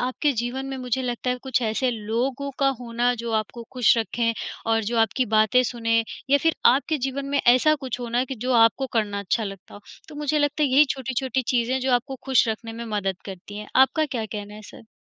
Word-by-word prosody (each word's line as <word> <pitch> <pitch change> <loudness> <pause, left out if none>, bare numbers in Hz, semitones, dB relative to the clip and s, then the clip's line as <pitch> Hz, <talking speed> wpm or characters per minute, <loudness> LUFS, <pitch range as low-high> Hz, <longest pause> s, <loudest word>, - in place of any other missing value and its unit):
आपके 255 +3 0
जीवन 245 +3 -3
में 270 0 -5
मुझे 255 +1 -2
लगता 250 0 -2
है 250 - 0
कुछ 260 -2 0
ऐसे 225 +4 0
लोगों 245 +5 -2
का 275 - +3
होना 240 +1 0
जो 230 - -3
आपको 235 +2 -11
खुश 245 -2 +4
रखें 230 +1 0 0.4
और 225 0 +2
जो 235 +2 -2
आपकी 225 +3 +2
बातें 220 +4 +4
सुने 230 -2 0 0.3
या 285 - +6
फिर 325 +3 +1 0.2
आपके 285 +3 0
जीवन 270 +2 -3
में 280 0 +1
ऐसा 255 +6 +5
कुछ 265 -4 -5
होना 240 +1 0
कि 265 - -6
जो 255 - +1
आपको 230 +3 +4
करना 210 -3 0
अच्छा 215 +3 -1
लगता 195 -2 -9
हो। 205 - -11 0.3
तो - - -11
मुझे 300 +1 0
लगता 290 +1 +1
है 290 - +3
यही 275 +3 +6
छोटी-छोटी 260 0 -2
चीज़ें 240 0 +1
हैं 265 - 0
जो 260 0 0
आपको 245 +3 0
खुश 265 -3 +3
रखने 225 +1 -4
में 235 +1 -6
मदद 195 -2 -1
करती 195 +1 -9
हैं। 210 - -8
आपका 265 +4 +4
क्या 240 -5 -3
कहना 205 0 -7
है 215 - -11
सर? 225 +2 -13
245 Hz, 225 wpm, -24 LUFS, 225-265 Hz, 0.4 s, या